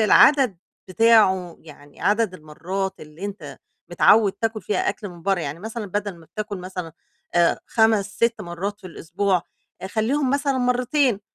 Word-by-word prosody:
العدد 250 - +5 0.3
بتاعه، 190 -4 +3
يعني 145 -2 -16
عدد 210 -2 +1
المرات 185 +5 -4
اللي 155 +5 -10
أنت 195 -8 -7 0.3
متعود 200 +4 +5
تاكل 225 -1 -3
فيها 205 - -1
أكل 205 - -4
من 175 -2 -13
برّه، 195 0 +1
يعني 150 0 -5
مثلًا 220 +1 -5
بدل 205 -1 -3
ما 165 -1 -17
بتاكل 210 0 -5
مثلًا 180 -2 -7 0.4
آآ 170 -1 +3
5، 220 -3 +3
6 230 -1 +1
مرات 195 +3 -5
في - - -10
الأسبوع 180 +2 -1 0.5
خلّيهم 255 +6 0
مثلًا 280 -1 0
مرتين 250 -1 +1
200 Hz, 150 wpm, -23 LUFS, 175-225 Hz, 0.5 s, العدد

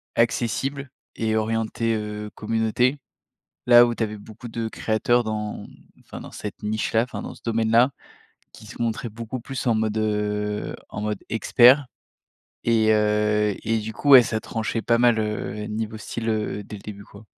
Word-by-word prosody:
accessible 130 +4 0 0.3
et 110 -1 0
orientée, 115 +1 -1
heu, 105 0 -5
communauté. 115 +4 +1 0.7
Là 120 0 +8
où 120 - -2
tu 115 - -1
avais 105 -1 -4
beaucoup 110 +4 -11
de 115 0 -3
créateurs 120 +3 +1
dans 105 -1 -4 0.4
enfin - - -10
dans - - -10
cette 105 - -7
niche 110 +2 -2
là, 110 +1 +4
enfin, 125 - -6
dans - - -7
ce - - -18
domaine 115 -1 0
là, 120 +3 +5 0.6
qui 110 - -14
se 105 - -9
montraient 115 +1 -1
beaucoup 115 +3 -6
plus 130 +1 -5
en 115 - +3
mode, 110 0 0
heu, 105 -1 -1
en 105 - -6
mode 105 -2 -2
expert. 125 +5 +5 0.8
Et 110 -2 +3
heu, 105 -1 +2
et 115 0 +1
du 110 +1 -5
coup, 145 +6 -3
ouais, 130 -2 +11
ça 110 -1 -2
tranchait 110 0 -3
pas 115 0 +2
mal, 120 -2 +4
heu, 105 0 -3
niveau 110 0 -4
style, 115 +1 -4
heu, 105 -1 -2
dès 105 - -9
le 100 - -14
début 100 -1 -8
quoi. 100 +2 -15
110 Hz, 180 wpm, -24 LUFS, 105-115 Hz, 0.8 s, ouais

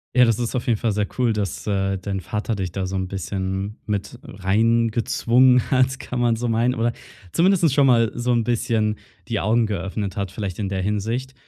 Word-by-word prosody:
Ja, 125 -1 +7
das 115 -1 +1
ist 120 -1 -2
auf 120 - -2
jeden 115 -3 +2
Fall 115 +1 0
sehr 105 0 0
cool, 125 -2 +2
dass, 105 -4 -3
äh, 95 -1 0
dein 95 +1 -4
Vater 105 +5 -3
dich 95 -3 -4
da 95 -1 -2
so 95 +1 -3
'n 95 0 -2
bisschen 95 +2 -4
mit 100 -2 -3
reingezwungen 115 +5 +2
hat, 130 0 +2
kann 125 - -4
man 120 -1 +2
so 120 +1 -2
meinen. 115 +3 +1
Oder 115 +1 +1 0.4
zumindest 170 -4 +3
schon 140 -1 +4
mal 115 -3 +4
so 120 +1 0
'n 120 -1 +2
bisschen 110 -2 0 0.3
die - - 0
Augen 115 +2 +2
geöffnet 100 0 -3
hat 100 -1 -2
vielleicht 100 -5 -5
in 100 - -1
der 95 -1 -2
Hinsicht. 110 +7 -2
110 Hz, 205 wpm, -22 LUFS, 100-120 Hz, 0.4 s, Ja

